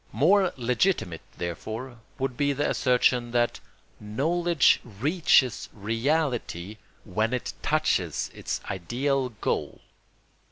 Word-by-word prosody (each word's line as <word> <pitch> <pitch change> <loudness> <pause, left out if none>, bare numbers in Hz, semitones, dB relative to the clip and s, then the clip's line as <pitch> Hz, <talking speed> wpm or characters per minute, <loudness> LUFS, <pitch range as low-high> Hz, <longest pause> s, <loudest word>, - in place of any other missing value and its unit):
More 180 - +4
legitimate, 120 - 0 0.2
therefore, 110 +9 -5 0.2
would 135 -2 -2
be 145 +2 +1
the 145 +2 0
assertion 125 -1 +2
that 120 -1 +1 0.4
knowledge 160 +9 +2
reaches 130 - +2
reality 115 - -1 0.3
when 110 +4 0
it 125 - -4
touches - - 0
its - - -4
ideal 130 +8 -1
goal. 115 - -3
125 Hz, 95 wpm, -26 LUFS, 110-145 Hz, 0.4 s, More